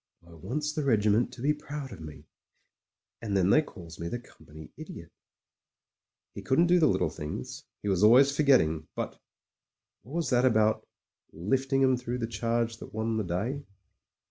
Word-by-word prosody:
"I 85 - -15
wants 135 - -3
the 155 - -2
regiment 110 -2 +2
to 125 -1 -9
be 150 +2 +3
proud 145 -2 -7
of 95 - -9
me 75 -2 -10 0.5
— - - -64
and 100 -3 -1
then 95 +1 +3
they 155 - +6
calls 85 - -11
me 85 - -4
the 120 - -3
Company 80 -10 -14
Idiot." - - -10 1.2
He - - -7
couldn't 165 +6 +3
do 175 +1 +4
the 160 - +5
little - - +1
things 75 -4 -6
— - - -17
^he - - -1
was 95 0 +1
always 135 +6 +6
forgetting, 80 - +3
but...! - - -5 0.8
What 130 +9 -10
was 170 -1 -1
that 125 0 +3
about 110 -3 +2 0.4
"lifting 135 - 0
'em 130 -1 +4
through 125 0 -4
the 120 - -2
charge 115 +1 -1
that - - -11
won 110 0 -1
the 110 - 0
day" 105 +11 -3
115 Hz, 180 wpm, -28 LUFS, 95-135 Hz, 1.2 s, they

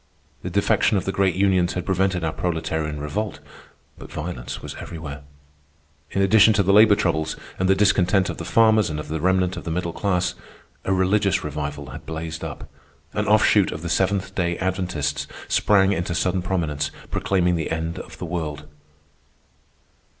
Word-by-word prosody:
The 90 - -4
defection 100 +2 +2
of 95 - -2
the 95 - 0
great 95 -1 +1
unions 95 -2 +2
had 90 - -4
prevented 95 -2 0
our 80 - -1
proletarian 80 -3 -2
revolt, 100 +8 -3 0.6
but - - -11
violence 75 -6 -5
was - - -7
everywhere. 75 -4 -7 0.9
In 100 - 0
addition 110 +2 +6
to 105 -1 +2
the 100 +1 +3
labor 105 0 +7
troubles, 80 -5 0 0.2
and 95 0 +1
the 95 - +5
discontent 95 -1 +3
of - - -4
the - - -5
farmers 110 -3 +4
and 75 -1 -3
of 75 - -7
the 80 0 -3
remnant 95 +1 +1
of - - -6
the - - -5
middle 85 0 -2
class, 90 -3 0 0.5
a - - 0
religious 95 +2 +2
revival 75 -1 -5
had - - -10
blazed 80 0 -5
up. - - -7 0.5
An - - -1
offshoot - - +4
of 80 - -6
the 85 - -3
Seventh 95 +2 0
Day 85 -2 -1
Adventists 80 -7 -2 0.2
sprang 100 -2 +3
into 85 -1 -2
sudden 90 +1 0
prominence, 80 -6 -1 0.2
proclaiming 90 -2 +1
the 80 -2 -2
end 80 +1 -3
of - - -10
the - - -5
world. 80 -3 -4
90 Hz, 170 wpm, -23 LUFS, 80-95 Hz, 0.9 s, labor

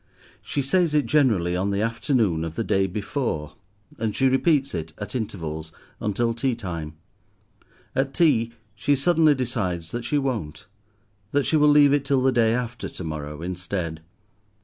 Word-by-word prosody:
She 140 - -2
says 165 +2 +2
it, 150 - +3
generally, 115 - +2
on 95 +2 0
the 100 +1 0
afternoon 115 - +1
of 80 -1 -5
the 115 - -1
day 95 -2 +2
before; 100 - -3 0.5
and 110 -2 -1
she 135 - +3
repeats 135 +1 +2
it, 80 -2 -4
at 100 0 -7
intervals, 80 -9 -4 0.3
until 115 +3 0
tea 120 +2 0
time. 85 -8 -6 1.0
At 135 0 +1
tea, 130 -8 +3 0.2
she 140 +8 +1
suddenly 155 +1 +4
decides 95 -10 -2
that 120 0 -4
she 150 - 0
won't, 110 - -3 0.7
that 145 -1 +2
she - - +2
will 150 -1 +5
leave 145 -1 +6
it 145 -1 +2
till 140 -2 +1
the 130 - +4
day 115 -2 +3
after 120 -1 -4
to - - -8
morrow 75 -1 -5
instead. 90 -2 -4
115 Hz, 165 wpm, -24 LUFS, 90-135 Hz, 1.0 s, leave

